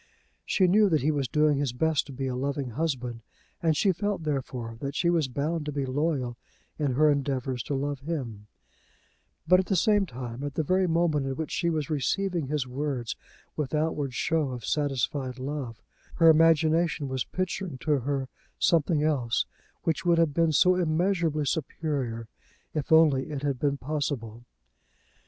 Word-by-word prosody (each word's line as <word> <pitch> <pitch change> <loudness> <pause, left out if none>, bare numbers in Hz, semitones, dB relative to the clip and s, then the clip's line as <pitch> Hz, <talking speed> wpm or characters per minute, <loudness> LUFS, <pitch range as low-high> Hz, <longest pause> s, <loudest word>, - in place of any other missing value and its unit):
She 190 - +3
knew 205 +3 +5
that 155 -6 +2
he 155 - +3
was 140 -3 -1
doing 150 +2 +2
his 140 -4 -1
best 155 +4 +1
to - - -9
be 135 0 -4
a 130 -1 -2
loving 135 0 -2
husband, 125 -4 -2 0.4
and 160 -3 +2
she 195 - +3
felt, 200 0 -2
therefore, 130 -6 -3
that 140 +2 -4
she 170 +2 +2
was 165 -5 +2
bound 150 +5 -2
to - - -1
be 140 -1 -2
loyal 130 -3 -1 0.4
in 145 -4 +1
her 150 +3 +4
endeavours 135 -3 -1
to 145 - -2
love 140 +1 -2
him; 130 -9 -5 1.0
but 185 +2 +6
at 190 - -1
the 195 - +1
same 205 +2 +3
time, 125 -1 -7
at 145 -1 -4
the 160 - +1
very 185 +4 +2
moment 160 -4 +1
in 135 - -2
which 160 0 -4
she 170 - 0
was 155 -3 -2
receiving 170 +2 0
his 145 -2 -1
words 130 -2 -3 0.4
with 150 -1 -2
outward 150 -4 -1
show 160 -1 +1
of 125 -3 -6
satisfied 135 -2 -1
love, 130 -4 -5 0.3
her 165 -1 +6
imagination 160 -1 +3
was 130 -1 -2
picturing 185 -4 -3
to 145 +2 +1
her 135 +1 -2 0.3
something 160 -2 +2
else 135 -7 +1 0.4
which 165 - 0
would 170 -1 +3
have 165 -3 +3
been 165 +1 +2
so 180 +5 +5
immeasurably 165 -2 +1
superior, 135 -6 -2 0.5
if 150 -1 -3
only 150 -5 +5
it 145 -2 -5
had 140 -3 -1
been 140 0 +1
possible. 130 -6 -4
145 Hz, 175 wpm, -27 LUFS, 130-160 Hz, 1.0 s, but